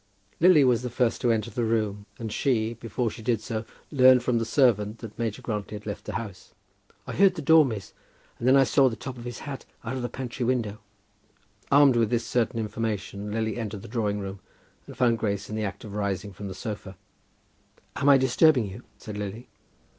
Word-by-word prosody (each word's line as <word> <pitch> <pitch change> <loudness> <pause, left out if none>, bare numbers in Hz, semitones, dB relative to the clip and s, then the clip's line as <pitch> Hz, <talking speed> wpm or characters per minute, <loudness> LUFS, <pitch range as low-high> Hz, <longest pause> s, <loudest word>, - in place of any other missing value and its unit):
Lily 170 -4 +7
was 125 -2 +3
the 125 - -3
first 120 -1 0
to 120 - +3
enter 115 0 -1
the 120 +3 -2
room, 110 -2 -1
and 110 -2 -5
she, 115 -5 +1
before 115 0 -3
she 115 - -10
did 115 0 +1
so, 110 0 -4 0.3
learned 130 -3 +6
from 125 -2 +1
the 115 - -1
servant 110 -4 +2
that 110 -1 -10
Major 115 -3 -3
Grantly 105 -2 -4
had 105 - -9
left 105 -1 -6
the - - -5
house. 105 -5 -7 0.5
"I - - -6
heard 195 -1 +4
the 160 - -4
door, 160 +2 +7
miss, 110 -8 -5 0.5
and 120 - -1
then 130 - +6
I 135 - +7
saw 135 0 +4
the 115 - -5
top 125 +2 -7
of 120 - -9
his 120 -1 -6
hat 140 -2 -6 0.2
out 120 +3 -3
of 130 - -3
the 120 - -3
pantry 125 +1 -5
window." 115 -4 -1 0.9
Armed 140 -3 +6
with 115 -2 +2
this 120 0 0
certain 115 -1 0
information 105 -2 -3
Lily 110 +1 -1
entered 105 -3 -5
the - - -9
drawing 105 -4 -1
room, 100 -1 -6 0.5
and - - -11
found 120 -3 +3
Grace 100 -2 -2
in - - -3
the 110 -1 -1
act 100 - -6
of 105 -3 -8
rising 100 -1 -2
from 100 +2 -7
the 95 - -6
sofa. 100 -3 -6 1.0
"Am 140 +1 +2
I 140 - +8
disturbing 130 0 +4
you?" 100 +5 -9 0.2
said 105 -1 -7
Lily. 105 +4 -6
115 Hz, 215 wpm, -26 LUFS, 105-125 Hz, 1.0 s, I